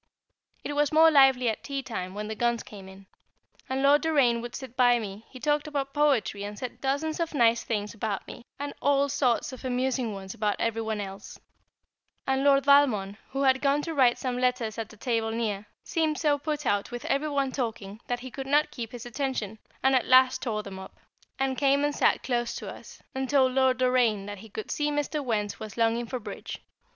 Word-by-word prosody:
It 290 - -4
was 290 0 +1
more 320 +1 +6
lively 270 -4 +5
at 220 - -1
tea 275 -1 -4
time, 190 -7 -5
when 210 0 -4
the 220 - -3
guns 235 +1 0
came 195 -3 -11
in. 190 +1 -14 0.6
And 265 +1 -1
Lord 285 +1 +5
Doraine 275 -8 +2
would 240 0 -7
sit 260 -2 -8
by 245 -2 +5
me; 210 -1 -7
he 255 - -11
talked 295 +2 0
about 275 -2 -3
poetry, 275 -9 +1
and 205 0 -6
said 250 +1 -7
dozens 285 +4 -1
of 335 -2 -2
nice 235 -3 +3
things 210 -2 -3
about 215 -3 -3
me, - - -10
and 285 0 -5
all 280 0 +3
sorts 255 -1 +1
of 260 - -10
amusing 255 -2 -1
ones 195 -1 -7
about 210 -1 0
every 225 0 -1
one 220 -1 -2
else; 195 0 -7 0.9
and 265 0 +1
Lord 275 -1 +4
Valmond, 235 -9 +4
who 270 +1 -2
had 265 -1 +3
gone 285 +1 +2
to 330 - -4
write 255 -5 +4
some 250 -1 -3
letters 250 -3 0
at 225 - -5
a 215 - -15
table 225 -1 -1
near, 215 -3 -2 0.2
seemed 315 -2 0
so 295 -2 +2
put 300 0 -3
out 205 -3 0
with 240 0 -7
every 285 +3 0
one 275 -2 0
talking, 220 -5 -4
that 245 0 -2
he 260 0 -8
could 270 +1 -6
not 295 +2 +3
keep 235 -1 -6
his 245 -1 -7
attention, 240 -4 -3 0.2
and 265 +1 +4
at 255 - +2
last 255 0 +5
tore 215 -4 -2
them 195 -2 -8
up, 190 - -11 0.4
and 265 -1 -1
came 280 0 +3
and 290 - 0
sat - - +2
close 240 -2 -1
to - - -6
us, - - -14
and 265 -1 -3
told 265 -3 +4
Lord 260 -1 +3
Doraine 245 -5 +2
that 205 -1 -7
he 220 +2 -12
could 215 +1 -6
see 295 0 0
Mr. 295 0 -2
Wertz 210 -5 -2
was 215 0 -8
longing 230 +1 +1
for 255 +2 -4
"Bridge." 225 - -7
250 Hz, 215 wpm, -27 LUFS, 220-275 Hz, 0.9 s, more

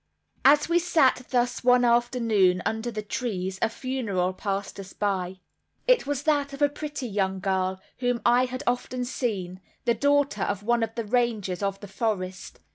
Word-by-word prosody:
As 290 +2 +6
we 340 +1 +3
sat 290 -7 +2
thus 245 -1 0
one 250 0 +5
afternoon 230 -6 +3
under 220 +2 -1
the 215 -2 -5
trees 190 -5 -3
a - - +2
funeral 225 -8 -2
passed 200 +1 -4
us 195 -1 -9
by. 190 -2 -2 0.4
It - - +3
was 290 -1 -2
that 285 -2 +1
of 275 - -8
a 290 - +5
pretty 290 -2 -5
young 195 -3 -1
girl, 190 -1 -1 0.2
whom 245 -1 0
I 245 +1 +5
had 255 +2 -5
often 250 0 -1
seen, 195 -8 -3 0.2
the 235 - +4
daughter 285 -6 +2
of 205 0 -1
one 235 +2 +2
of 225 0 -2
the 230 -2 -3
rangers 215 -5 0
of 195 -1 -1
the 205 - -8
forest. 190 -3 -3
230 Hz, 175 wpm, -26 LUFS, 195-255 Hz, 0.4 s, As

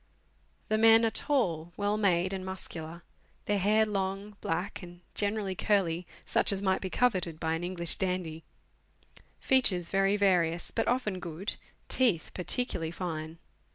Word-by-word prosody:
The 215 0 +2
men 225 +1 +7
are 225 - +1
tall, 175 - 0
well 205 0 0
made, 185 -3 +1
and 190 -1 -4
muscular; 170 -3 -6 0.4
their 205 -1 +1
hair 215 +3 +3
long, 200 0 -3
black, 180 +5 -3
and 175 -1 -12
generally 205 -1 -1
curly 180 -4 0 0.2
(such - - +2
as 195 - -1
might 190 -1 0
be 190 - -3
coveted 185 -9 0
by 160 -1 -1
an 165 +1 -3
English 175 -1 +2
dandy); 180 -4 -2 1.0
features 190 -10 +3
very 195 +1 +2
various, 175 -4 +2
but - - -1
often 225 -7 0
good; 175 +3 -4 0.3
teeth 230 -11 +1
particularly 180 -3 0
fine. 160 -2 -5
190 Hz, 145 wpm, -30 LUFS, 170-205 Hz, 1.0 s, men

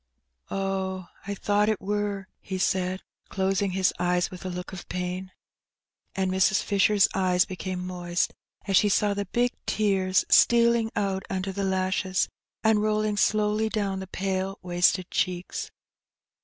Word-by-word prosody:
Oh, 190 -2 -2 0.2
I 200 - -2
thought 205 +2 +1
it 215 - 0
wur," 205 0 -2
he 190 - -5
said, 185 0 0 0.3
closing 195 0 0
his 190 0 +2
eyes 180 0 +1
with 185 - -9
a 185 - -3
look 180 0 -6
of 185 - -9
pain. 180 +1 -4 0.8
And 190 -1 0
Mrs. 190 +1 +3
Fisher's 200 0 +4
eyes 180 -2 +3
became 185 -1 -5
moist, 175 -1 -1 0.3
as 195 -2 +3
she 205 +3 +4
saw 205 0 +2
the 200 0 -2
big 240 +5 +1 0.2
tears 190 -3 +2
stealing 235 -1 +5
out 195 -2 0
under 190 0 -2
the 200 +1 -3
lashes, 190 0 0 0.4
and 220 -1 +4
rolling 215 0 +1
slowly 215 +1 +2
down 200 -3 -1
the 190 - -6
pale 190 +1 -2
wasted 175 +1 +2
cheeks. 180 -1 -2
190 Hz, 145 wpm, -26 LUFS, 185-205 Hz, 0.8 s, stealing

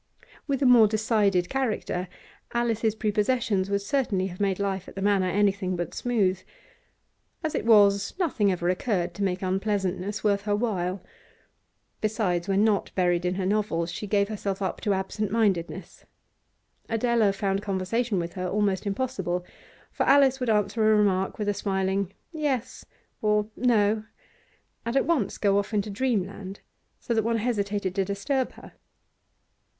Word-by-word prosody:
With 275 -1 0
a - - +3
more 240 -3 +7
decided 210 -4 +1
character, 225 -8 -2 0.5
Alice's 225 -2 +1
prepossessions 210 -2 0
would 200 0 0
certainly 210 -6 0
have 180 -1 -7
made 195 -2 +1
life 195 -2 -2
at - - -11
the 195 - -5
Manor 200 -2 +2
anything 195 -1 +1
but 175 0 -4
smooth; 200 -7 +1 1.0
as 315 - -1
it - - -2
was, 200 -3 +5
nothing 250 - +1
ever 175 -1 -2
occurred 180 -1 0
to 200 - -4
make 185 -1 -1
unpleasantness 195 +1 -1
worth 200 -2 +2
her 205 -1 +1
while. 195 -4 -2 1.0
Besides, 205 -5 0
when 195 +1 +2
not 215 -3 +1
buried 175 -1 +1
in 180 +1 0
her 190 -1 -2
novels, 185 -4 0
she 210 - -5
gave 200 0 +2
herself 200 -2 -3
up 190 -2 -3
to 205 -3 +1
absentmindedness; 195 -2 -2 0.8
Adela 230 -2 +2
found 195 0 -1
conversation 205 +3 -1
with 170 -1 -3
her 185 -2 -3
almost 205 0 0
impossible, 195 -6 -2 0.5
for - - -1
Alice 270 -1 +5
would 250 -2 -1
answer 210 +1 +1
a 215 - +5
remark 190 -2 +1
with 210 - -3
a 205 - +2
smiling 195 -1 -1 0.2
'Yes' 270 -6 -2 0.4
or 210 0 +1
'No,' 215 -3 +2 0.8
and 235 +3 -1
at - - +2
once 275 - 0
go 200 -1 +3
off 205 +2 -3
into 205 0 -1
dreamland, 200 -4 -2 0.4
so 235 - -2
that 225 - +2
one 230 +1 +1
hesitated 205 -4 -1
to 195 0 +1
disturb 245 +8 -1
her. - - -13
205 Hz, 155 wpm, -26 LUFS, 190-225 Hz, 1.0 s, more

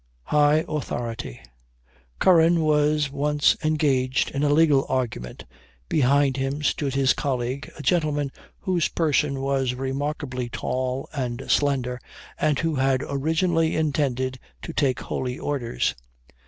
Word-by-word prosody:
HIGH 150 +1 +3
AUTHORITY. 115 - -4 0.8
Curran 170 -2 +5
was 150 -1 +2
once 145 +1 +2
engaged 140 -5 +1
in 140 - -2
a 145 - +2
legal 145 -2 +4
argument; 115 - -3 0.4
behind 140 -1 +3
him 135 +2 -2
stood 140 -2 0
his 135 -1 +3
colleague, 130 -1 -3
a 150 - -8
gentleman 150 -5 +1 0.3
whose 180 -3 +1
person 150 -4 0
was 135 -2 0
remarkably 135 -1 -3
tall 130 +2 -3
and 125 -3 -3
slender, 130 -4 +1 0.4
and 150 -2 +2
who 165 +1 0
had 135 -1 +1
originally 160 +3 +1
intended 135 -4 0 0.2
to 165 - -6
take 135 -5 +1
holy 125 -1 -3
orders. 125 - -1
140 Hz, 120 wpm, -24 LUFS, 130-150 Hz, 0.8 s, Curran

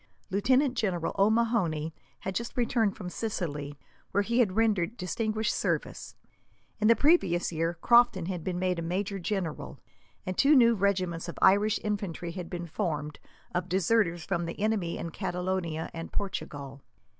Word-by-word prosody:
Lieutenant 255 +7 +3
General 185 -8 -1
O'Mahony 200 -8 +2 0.3
had 190 - -3
just 235 +5 -4
returned 230 -4 +1
from 185 -5 -6
Sicily, 150 -8 -4 0.3
where 200 +1 +1
he 235 +4 0
had 200 -6 +3
rendered 220 -2 +1
distinguished 215 +3 -1
service. - - -2 0.6
In 215 - +3
the 230 - +7
previous 225 - +3
year, 165 +1 -1
Crofton 235 -7 +5
had 180 -2 -4
been 180 0 -2
made 180 -1 0
a - - -2
major 195 +4 -2
general, 180 -4 -3 0.5
and 185 - -3
two 290 +8 +5
new 235 -3 +6
regiments 185 -5 0
of - - -8
Irish 205 +3 +4
infantry 195 -5 -3
had 180 -1 -6
been 175 -1 -5
formed, 150 -4 -3 0.3
of 180 +1 -2
deserters 180 -2 +2
from 170 -3 -1
the 170 - -6
enemy 205 -5 0
in 165 - -5
Catalonia 180 -2 -3
and 165 0 -6
Portugal. 140 -8 -5
185 Hz, 155 wpm, -29 LUFS, 170-215 Hz, 0.6 s, the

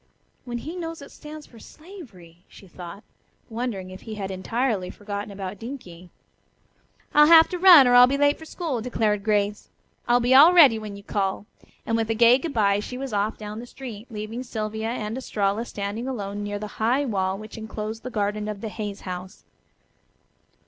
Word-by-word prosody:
"When 240 -1 -4
he 315 +8 -7
knows 330 -4 -6
it 280 - -13
stands 300 0 -11
for 230 - -17
slavery," 215 - -14
she 195 - -16
thought, 175 +3 -10 0.5
wondering 220 -6 -4
if 185 - -10
he 220 -2 -7
had 195 -2 -5
entirely 205 0 -2
forgotten 205 0 -6
about 195 -1 -7
Dinkie. 185 -9 -9 1.0
"I'll 300 0 +7
have 325 0 +8
to 360 - -4
run, 345 -8 +9
or 245 - +4
I'll 245 0 +9
be 275 +2 0
late 290 +1 +2
for 320 - -10
school," 310 -8 -4
declared 215 -4 -1
Grace. 205 -1 0 0.4
"I'll 240 0 +4
be 245 +1 +2
all 300 +7 +8
ready 280 -11 +7
when 210 -2 -7
you 200 - -12
call," 200 -1 -2 0.4
and 225 - 0
with 225 -1 -1
a 225 - +1
gay 235 +3 +6
good 325 +2 -4
bye 205 -4 +2
she 250 +4 -6
was 265 -3 -5
off 205 +2 -1
down 210 0 -7
the 245 - -9
street, 240 -4 -9
leaving 215 +2 -6
Sylvia 220 -2 -4
and 225 0 -4
Estralla 210 -2 -1
standing 205 +3 -5
alone 205 -5 -4
near 205 0 -4
the 210 +1 -8
high 250 +6 +2
wall 190 -5 -1
which 215 +1 -10
enclosed 220 0 -6
the 255 - -6
garden 210 -2 -2
of 210 -2 -5
the 220 - -4
Hayes 205 -2 -6
house. 185 0 -8
220 Hz, 190 wpm, -24 LUFS, 205-255 Hz, 1.0 s, run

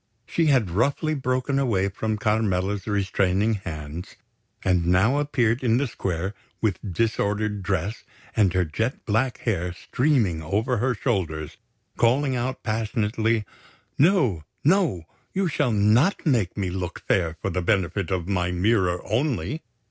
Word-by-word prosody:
She 165 +5 +1
had 125 - +3
roughly 140 - +1
broken 130 0 0
away 105 -8 +1
from 110 +2 -2
Carmela's 105 -3 0
restraining 100 +1 +1
hands, 80 -4 -6 0.5
and 90 -3 +2
now 105 +10 +3
appeared 125 -4 +1
in 120 -1 +3
the 140 - +1
square 95 -5 -3 0.3
with 105 -4 0
disordered 105 0 0
dress 95 +3 -2 0.3
and 100 -5 +4
her 90 -1 +2
jet 110 - -3
black 115 +4 +1
hair 90 -6 -1
streaming 115 - +1
over 110 - 0
her 125 +3 +1
shoulders, 85 - -2 0.4
calling 130 +3 +2
out 125 +2 -3
passionately: 110 0 0 0.5
"No! 140 - +3 0.2
No! 160 - +2 0.3
You 195 0 +1
shall 145 -6 +1
not 110 - +3
make 115 - +1
me 95 -3 -1
look 90 -1 -4
fair 85 -3 +1
for 100 - -2
the 90 +1 -1
benefit 95 -1 0
of 90 -2 -2
my 90 -3 0
mirror 90 -1 +1
only! 140 +6 -1
105 Hz, 140 wpm, -25 LUFS, 95-125 Hz, 0.5 s, and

